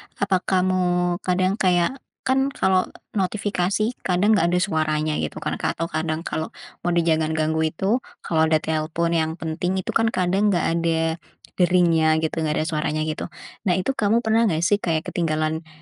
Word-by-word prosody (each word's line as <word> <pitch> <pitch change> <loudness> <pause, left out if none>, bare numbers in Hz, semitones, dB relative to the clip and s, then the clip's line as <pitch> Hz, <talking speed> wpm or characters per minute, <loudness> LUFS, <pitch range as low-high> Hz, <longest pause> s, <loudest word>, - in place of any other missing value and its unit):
apa 200 -2 +1
kamu 180 -1 +1
kadang 185 +2 0
kayak 180 +7 +2 0.2
kan 265 +1 +2
kalau 185 -1 +2 0.2
notifikasi 200 +1 0
kadang 190 +4 +2
gak 185 -6 +4
ada 175 - +1
suaranya 155 -4 0
gitu 75 - -4
kan, - - -3
ka - - -1
atau 165 +1 -3
kadang 160 +1 -2
kalau 160 - -3 0.4
mode 170 -1 +2
jangan 160 -1 +1
ganggu 160 0 +1
itu 195 +10 0 0.2
kalau 160 -1 +2
ada 155 -1 +2
telepon 160 +2 -1
yang 160 -1 +1
penting 170 +2 -2
itu - - -3
kan 225 - +2
kadang 190 0 +1
nggak 185 -4 +2
ada 165 0 0 0.4
deringnya 170 -3 +4
gitu, 160 - 0
nggak 155 -1 0
ada - - -5
suaranya 155 0 -1
gitu. 155 0 -3 0.4
Nah 180 - +3
itu 185 +8 0
kamu 230 -2 +1
pernah 225 +1 +3
gak 165 -4 0
sih 205 +4 +3
kayak 160 -4 -1
ketinggalan, 160 -1 -1
170 Hz, 170 wpm, -23 LUFS, 160-190 Hz, 0.4 s, gak